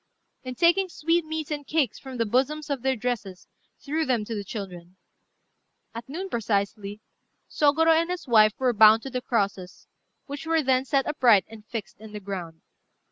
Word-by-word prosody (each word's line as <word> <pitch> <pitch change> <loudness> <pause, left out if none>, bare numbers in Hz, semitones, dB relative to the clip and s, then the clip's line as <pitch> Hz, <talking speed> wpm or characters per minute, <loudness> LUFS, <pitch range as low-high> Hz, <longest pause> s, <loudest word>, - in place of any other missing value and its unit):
and 255 -1 -7
taking 365 +3 +3
sweetmeats 315 -2 -1
and 290 -2 -4
cakes 295 -8 0
from 265 -2 -9
the 230 - +1
bosoms 280 +7 0
of 275 -3 -2
their 265 +1 +1
dresses 215 -6 -4 0.3
threw 310 +3 -2
them 245 -7 0
to 230 - -5
the 205 -2 -4
children. 185 -4 -8 1.0
At 230 +2 -8
noon 360 +7 -5
precisely 205 - -2 0.5
Sôgorô 315 +2 +3
and 335 - -4
his 360 -4 -5
wife 215 -3 +5
were 255 -2 +1
bound 220 +1 +6
to 270 - -7
the 250 0 -3
crosses, 200 -7 -2 0.4
which 285 +2 -7
were 325 -1 +2
then 260 0 +2
set 275 0 +1
upright 240 - +4
and 220 -1 -14
fixed 200 -8 -7
in 215 -1 -12
the 210 - -5
ground. 180 -5 -7
245 Hz, 175 wpm, -25 LUFS, 210-295 Hz, 1.0 s, bound